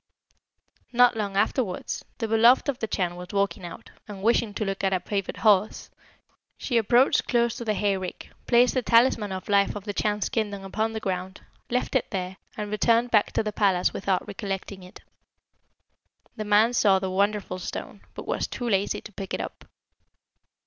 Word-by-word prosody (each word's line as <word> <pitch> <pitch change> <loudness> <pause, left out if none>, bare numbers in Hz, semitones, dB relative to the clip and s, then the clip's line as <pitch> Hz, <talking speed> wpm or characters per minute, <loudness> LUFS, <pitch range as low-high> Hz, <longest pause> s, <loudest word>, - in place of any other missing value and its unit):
Not 245 0 +5
long 200 -3 -3
afterwards, 200 -2 -1
the 225 - -2
beloved 230 +5 +5
of 275 -3 -1
the 220 - -2
Chan 180 -4 -1
was 180 0 -8
walking 200 -2 -1
out, 170 -1 -10 0.2
and 200 -2 -9
wishing 230 -1 +2
to 215 - -2
look 195 0 -3
at 195 0 +2
a 185 - +1
favourite 195 +1 -4
horse, 210 -1 +2 0.7
she 240 -3 0
approached 240 +4 +3
close 235 -2 +1
to 235 - -6
the 215 -1 0
hayrick, 195 -3 -2 0.2
placed 245 0 +4
the 255 - +1
talisman 230 -3 +3
of 185 0 -6
life 200 0 +2
of 205 - -6
the 205 -1 -4
Chan's 210 -1 0
kingdom 205 -5 -2
upon 220 +3 -2
the 220 - -3
ground, 190 -2 -4 0.3
left 250 +1 -1
it 260 - +1
there, 185 -1 -4 0.2
and 210 -1 -4
returned 230 +3 +2
back 210 -2 +3
to - - +1
the 215 -1 -3
palace 190 -4 +2
without 190 -1 -1
recollecting 195 -1 -5
it. 180 0 -13 1.3
The 215 -2 -5
man 210 +3 +4
saw 200 -5 +4
the 190 -1 -3
wonderful 200 -1 0
stone, - - -7
but - - -7
was - - -1
too 245 - -5
lazy 200 -2 0
to - - -11
pick 195 -1 -5
it - - -6
up. - - -7
205 Hz, 185 wpm, -25 LUFS, 195-230 Hz, 1.3 s, Not